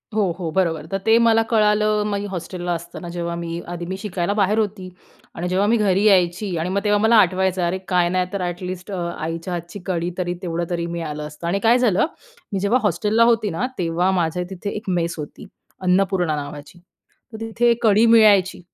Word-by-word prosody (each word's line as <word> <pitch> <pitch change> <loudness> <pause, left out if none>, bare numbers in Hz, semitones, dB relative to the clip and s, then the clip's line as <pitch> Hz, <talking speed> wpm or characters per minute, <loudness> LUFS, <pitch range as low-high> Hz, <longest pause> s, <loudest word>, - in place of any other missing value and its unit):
हो, 200 -5 +2
हो. 170 -3 -3
बरोबर. 165 -5 0
तर 195 - 0
ते 225 +1 +5
मला 225 -1 +4
कळालं 210 -1 +3
मी 200 0 -2
हॉस्टेलला 175 0 -4
असताना, 170 +1 -7
जेव्हा 170 -1 -3
मी 170 0 -4
आधी 175 0 -5
मी 190 +2 -4
शिकायला 195 -1 -2
बाहेर 205 +1 +1
होती. 200 -3 -3 0.5
आणि 175 +2 -3
जेव्हा 190 +2 +1
मी 235 +2 +3
घरी 200 -2 +2
यायची 185 -1 +2
आणि 170 +3 -2
मग 200 +2 -1
तेव्हा 205 0 +3
मला 220 +2 +4
आठवायचं, 185 0 -1
अरे 175 +2 -1
काय 180 -2 +2
नाही 185 0 +1
तर, 200 - -2
ॲटलीस्ट 180 +2 -5
अ, 190 - -3 0.2
आईच्या 165 +3 -4
हातची 175 +3 -6
कढी 175 -2 -2
तरी 175 -1 -1
तेवढं 170 -2 -2
तरी 170 -1 -2
मिळालं 150 -3 -4
असतं? 150 +3 -8
आणि 195 +3 0
काय 230 +2 +5
झालं? 220 -4 +3 0.5
मी 195 - 0
जेव्हा 205 +6 +2
हॉस्टेलला 210 +4 +2
होती 230 -3 +3
ना 165 +8 -2
तेव्हा 175 +1 0
माझ्या 180 -1 0
तिथे 195 +2 -5
एक 210 -2 -5
मेस 170 -2 0
होती, 150 +6 -8 0.4
अन्नपूर्णा 180 -3 +1
नावाची. 145 +3 -8 0.5
तर - - -6
तिथे 235 +1 +2
कढी 215 0 +5
मिळायची 200 -5 +5
185 Hz, 195 wpm, -21 LUFS, 170-210 Hz, 0.5 s, ते